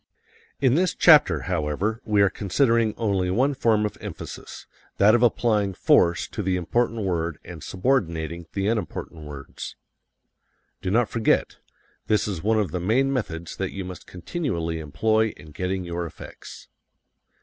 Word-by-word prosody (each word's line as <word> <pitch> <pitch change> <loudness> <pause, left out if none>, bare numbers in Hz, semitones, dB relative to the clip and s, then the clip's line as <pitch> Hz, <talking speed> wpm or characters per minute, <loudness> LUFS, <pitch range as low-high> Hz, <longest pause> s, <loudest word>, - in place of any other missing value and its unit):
In 130 -3 +3
this 180 +5 +2
chapter, 155 -3 +6
however, 90 +5 -1
we 105 -2 +3
are 100 - +4
considering 115 +1 +1
only 100 -5 0
one 130 +9 +2
form 115 -5 +2
of 105 - -5
emphasis: - - -8 0.3
that 105 +2 +6
of 120 - +4
applying 105 -5 +2
force 85 0 +3
to - - -4
the 95 -2 0
important 115 +5 0
word 85 -5 -1
and 85 -3 -9
subordinating 85 - -1
the 100 -1 -1
unimportant 95 -7 -3
words. 70 -2 -8 1.1
Do - - -2
not 115 +3 +3
forget: 115 0 +1 0.5
this 105 -1 +2
is 95 -6 -3
one 110 +4 +2
of 100 -7 -1
the 90 - -2
main 125 +10 +2
methods 85 -10 -4
that 95 -1 -3
you 95 -2 -5
must 90 0 -9
continually 85 - -3
employ 110 +9 +1
in 75 +1 -13
getting 90 +4 -2
your 85 0 -3
effects. - - -11
100 Hz, 150 wpm, -24 LUFS, 85-115 Hz, 1.1 s, chapter